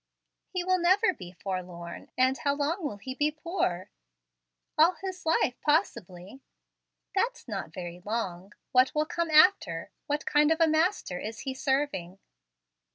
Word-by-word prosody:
"He 365 -1 -2
will 370 0 +2
never 375 +3 +4
be 180 - -10
forlorn; 180 -2 -6
and 260 +1 +4
how 280 +2 +1
long 310 +6 -1
will 280 -9 -3
he 260 +6 -6
be 295 +3 +1
poor?" 305 - -2 0.8
"All 325 +4 +5
his 370 -1 -7
life 255 -6 +1
possibly." 210 - -1 0.7
"That's 470 - -1
not 195 -8 -5
very 175 0 -7
long. 195 -3 -4 0.2
What 255 +1 +4
will 305 0 +2
come 340 +1 -2
after? 340 +6 +4 0.2
What 295 0 -1
kind 295 +1 +4
of 320 - +2
a 330 - +6
master 315 - +1
is 220 +1 -6
he 265 -1 -3
serving?" 265 -10 -1
280 Hz, 150 wpm, -28 LUFS, -, 0.8 s, a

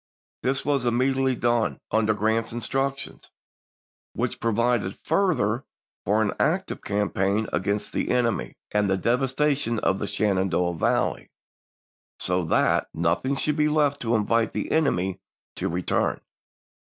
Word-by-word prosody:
This 135 +1 0
chap.vii. 145 - -1
was 135 -3 0
immediately 130 +2 +2
done, 120 -1 0
under 110 -1 +2
Grant's 110 +2 0
instructions, 135 +3 -3 0.8
which - - -2
provided 115 -3 0
further 155 - +1 0.4
for 105 +3 +3
an 105 - -1
active 185 +6 0
campaign 100 +1 0
against 100 +4 -1
the - - -1
enemy, 120 -3 0 0.2
and 105 -1 +1
the 95 - +2
devastation 135 +2 +1
of 95 -2 +1
the 100 - -3
Shenandoah 95 -4 +1
Valley, 80 - 0 0.9
so 90 0 0
that - - +2
"nothing 85 +12 0
should 150 +2 -1
be 150 0 +3
left 150 -2 +2
to 115 0 +1
invite 115 +1 +1
the - - -3
enemy 95 - +1 0.4
to - - -1
return. 90 +1 0
115 Hz, 130 wpm, -25 LUFS, 100-135 Hz, 0.9 s, for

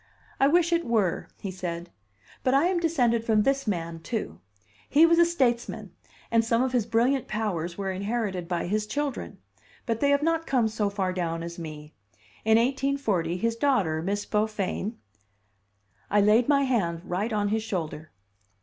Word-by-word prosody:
"I 275 - +5
wish 340 +3 +3
it 335 0 +2
were," 215 -7 0
he 195 - -5
said; 175 -2 -5 0.5
"but 260 +1 +2
I 280 +4 +4
am 360 -1 +1
descended 250 -9 +1
from 220 -2 +3
this 275 0 0
man, 170 -4 -2
too. 165 - -4 0.5
He 305 +3 +6
was 335 0 +4
a 340 - +7
statesman, 255 -8 -1 0.4
and 230 0 +4
some 230 +2 +2
of 260 - -1
his 240 -4 0
brilliant 245 +3 +1
powers 180 -6 -2
were 195 -1 -2
inherited 195 -2 -2
by 175 -1 -2
his 210 +3 -1
children 290 0 -3 0.5
but 230 -2 -1
they 285 - +2
have 285 +1 +3
not 330 0 0
come 250 -4 +2
so 215 -2 -1
far 190 -2 -2
down 165 -2 -2
as 170 +1 -7
me. 150 -2 -8 0.5
In 220 0 +5
1840, 240 -9 0
his 230 +4 0
daughter, 205 - +1
Miss 200 +4 -2
Beaufain 210 0 -2 0.6
" 100 -1 -41
I 205 - +3
laid 215 +5 +4
my 280 -1 +4
hand 190 -11 0
right 200 +7 -2
on 205 -1 0
his 220 +1 0
shoulder. 165 -7 -4
215 Hz, 175 wpm, -26 LUFS, 180-260 Hz, 0.6 s, a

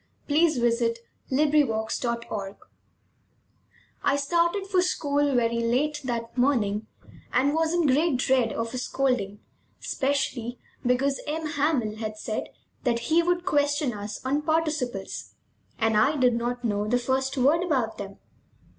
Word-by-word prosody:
THE 285 - -3
LAST 325 -4 +3
LESSON 235 -1 +2 0.4
BY 295 +2 +4
ALPHONSE 220 0 -2
DAUDET 235 -5 -3 1.5
I 280 - +3
started 340 +7 +1
for 380 -2 +2
school 290 -5 +1
very 235 -1 +2
late 275 +6 0
that 235 -2 -3
morning 220 -5 +1 0.4
and 275 +3 +2
was 320 0 +1
in 345 -1 +2
great 290 +1 +3
dread 255 -2 +2
of 230 +1 -3
a 255 - -2
scolding, 245 -7 -1 0.4
especially 265 -4 -1 0.3
because 265 +3 +1
M. 315 +2 -2
Hamel 285 -8 0
had 215 -1 -5
said 215 0 -3 0.4
that 235 +2 -1
he 335 - +6
would 350 +1 0
question 290 -5 +1
us 205 +3 -7
on 280 +3 +1
participles, 305 -10 -2 0.4
and 220 -1 +1
I 240 +9 +4
did 250 -3 +3
not 240 +1 -2
know 205 -1 0
the 245 +3 +2
first 265 +2 -1
word 285 +6 +4
about 265 -12 0
them. 200 -1 -7
260 Hz, 145 wpm, -26 LUFS, 230-295 Hz, 1.5 s, he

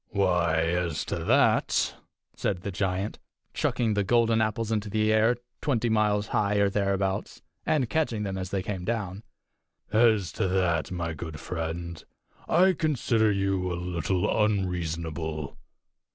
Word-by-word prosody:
"Why, 90 -5 +2
as 85 -1 -1
to - - -3
that," - - +3 0.4
said 90 -3 -2
the 100 - -3
giant, 95 +1 -2 0.3
chucking 115 -3 0
the 105 -1 +1
golden 115 +1 +3
apples 110 +1 -1
into 105 -1 -1
the 110 +1 +2
air 110 +2 +3 0.2
twenty 120 -5 +1
miles 105 -2 +1
high 105 0 +1
or 100 -1 +3
thereabouts, 95 -1 -1 0.2
and 145 -6 +2
catching 120 -7 0
them 95 -2 -3
as 95 -1 -4
they 95 -2 -2
came 95 -3 -4
down 100 -3 -3 0.7
"as 110 -6 +4
to 100 - -1
that, 90 -4 +1
my 85 -2 -3
good 80 0 -7
friend, 85 0 -5 0.4
I 185 +3 +5
consider 120 -9 +1
you 95 -2 0
a - - -1
little 90 +4 0
unreasonable. 85 -6 -2
100 Hz, 140 wpm, -27 LUFS, 90-110 Hz, 0.7 s, I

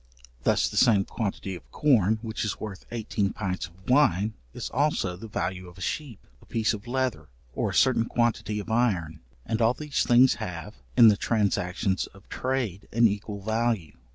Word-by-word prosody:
Thus - - +2
the - - -5
same 100 -4 +5
quantity 100 -3 -3
of 90 - -11
corn 110 -8 +3
which 110 -1 -3
is 110 - -2
worth 105 -3 -7
eighteen 105 -3 -2
pints 95 -3 -3
of 90 +3 -21
wine, 110 -6 +3 0.2
is - - -6
also 130 -10 +1
the 110 +5 -9
value 95 -3 -3
of 90 - -17
a - - -11
sheep, 130 - -4 0.2
a - - -18
piece 115 0 +1
of 105 +2 -7
leather, 130 0 -2 0.2
or - - -1
a - - -4
certain 125 -3 +4
quantity 115 -3 0
of 110 +2 -6
iron; 100 -10 +1 0.3
and 115 +1 -1
all 115 +2 +4
these 150 0 -1
things 125 +2 +6
have, 90 +1 -5 0.2
in 115 -3 +9
the 105 - +3
transactions 95 -3 0
of 95 - -17
trade 125 -7 -2
an 115 +1 +5
equal 100 -1 -4
value. 110 -6 0
110 Hz, 180 wpm, -27 LUFS, 95-120 Hz, 0.3 s, in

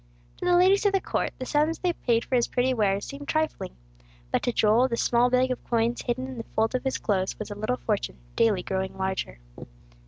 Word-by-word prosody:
To - - -5
the 355 0 +4
ladies 390 +3 +4
of 400 - +1
the 390 - +3
court, - - -1
the 255 - -5
sums 305 +4 +1
they 360 -1 0
paid 235 -6 0
for - - -7
his 240 - +2
pretty 255 +1 +1
wares 200 -4 +1
seemed 285 0 -8
trifling; 310 - -2 0.6
but - - +1
to 245 - 0
Joel 225 +3 +3
the 235 -2 -2
small 240 +1 +3
bag 255 +1 +2
of 255 - -4
coins 235 0 +1
hidden 255 +1 -2
in 260 -1 -7
the - - -4
folds 220 +2 +1
of 255 - -1
his 265 -1 -1
clothes 190 -3 -1
was 215 -1 -6
a - - -5
little 215 +5 -1
fortune, 210 -5 -2 0.2
daily 215 -6 +2
growing 190 0 -3
larger. 190 - -3
240 Hz, 225 wpm, -26 LUFS, 215-265 Hz, 0.6 s, the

